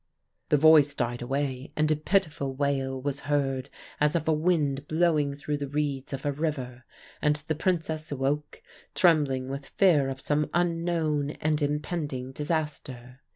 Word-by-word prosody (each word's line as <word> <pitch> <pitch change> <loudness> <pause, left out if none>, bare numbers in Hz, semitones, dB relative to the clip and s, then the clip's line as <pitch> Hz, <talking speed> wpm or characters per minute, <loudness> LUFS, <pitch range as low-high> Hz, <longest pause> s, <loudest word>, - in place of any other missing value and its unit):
"The 150 - +5
voice 150 -1 +6
died 120 -2 -2
away, 135 +1 -3
and 155 0 +2
a - - +4
pitiful 150 -4 0
wail 135 -1 -1
was 140 +1 -3
heard 135 -2 0 0.3
as 150 +2 +2
of 160 -2 -1
a 160 - +4
wind 150 -4 +1
blowing 155 -4 +2
through 145 +1 -3
the 145 -1 -4
reeds 145 -1 -2
of 135 0 -5
a 145 - +2
river. 135 -5 -4 0.4
And 150 -1 +3
the 155 - 0
Princess 160 -2 -1
awoke, 145 +2 -2 0.3
trembling 145 -7 +3
with 135 +1 -6
fear 155 -9 +3
of 135 0 -5
some 150 +2 0
unknown 165 -4 0
and 155 0 0
impending 145 -3 -2
disaster. 145 -5 -4
145 Hz, 155 wpm, -27 LUFS, 135-155 Hz, 0.4 s, voice